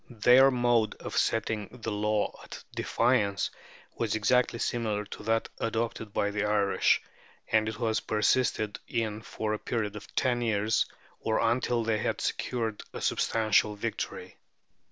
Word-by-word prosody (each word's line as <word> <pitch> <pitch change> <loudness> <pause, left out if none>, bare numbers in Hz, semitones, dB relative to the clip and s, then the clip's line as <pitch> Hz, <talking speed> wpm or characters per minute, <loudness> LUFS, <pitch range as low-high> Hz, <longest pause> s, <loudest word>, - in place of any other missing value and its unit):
Their 130 +2 +8
mode 120 -4 +2
of - - -7
setting 110 -2 0
the 115 -3 -5
law 105 0 0
at - - -10
defiance 110 -5 +1 0.4
was 110 -2 -1
exactly 115 +3 +2
similar 110 -3 -1
to - - -9
that 115 0 +1
adopted 115 -1 -2
by 100 0 0
the 100 0 -1
Irish, 105 -1 +2 0.5
and 110 0 +3
it 110 - -6
was 110 -2 0
persisted 110 -1 +1
in 110 -2 -2
for 110 -1 -3
a 105 - -2
period 105 -3 -2
of 105 - -10
ten 125 -2 +1
years, 110 -1 +1 0.3
or 110 - 0
until 120 0 +1
they 110 -1 0
had - - -1
secured 115 -4 -2
a - - -6
substantial 110 -1 +2
victory. 105 - -5
110 Hz, 145 wpm, -29 LUFS, 105-115 Hz, 0.5 s, Their